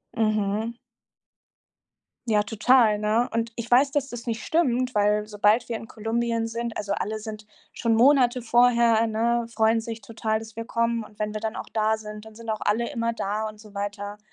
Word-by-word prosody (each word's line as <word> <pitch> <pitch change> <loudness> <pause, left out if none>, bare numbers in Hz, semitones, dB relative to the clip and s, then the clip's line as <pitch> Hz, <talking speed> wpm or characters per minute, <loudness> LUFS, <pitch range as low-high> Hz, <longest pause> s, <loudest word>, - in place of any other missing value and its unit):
Mhm. 215 +1 0 1.5
Ja, 210 -2 +3
total, 220 0 +3
ne? 220 +3 +1
Und 230 0 0
ich 235 0 -5
weiß, 265 +3 +5
dass 275 -1 -1
das 240 -3 -8
nicht 225 -1 -3
stimmt, 255 -6 +1
weil 210 0 +2
sobald 210 +2 +2
wir 235 - -2
in 225 - -9
Kolumbien 230 +1 -1
sind 230 0 -4
also 205 -1 -2
alle 215 +2 -2
sind 215 -1 -8 0.3
schon 230 -2 +1
Monate 250 0 +4
vorher, 235 -1 +4
ne 235 +2 0
freuen 225 0 +3
sich 225 0 -7
total, 220 -3 -2
dass 220 -1 -11
wir 230 - -5
kommen, 230 0 0
und 210 -1 -15
wenn 210 0 -2
wir 215 - -3
dann 220 0 -3
auch - - -6
da 220 0 +2
sind, 210 0 -9
dann 220 -1 -14
sind 230 0 -11
auch 215 -1 -2
alle 230 +3 0
immer 230 -3 -1
da 215 0 -2
und 215 0 -11
so 210 -1 -15
weiter. 205 0 -5
225 Hz, 195 wpm, -25 LUFS, 215-235 Hz, 1.5 s, weiß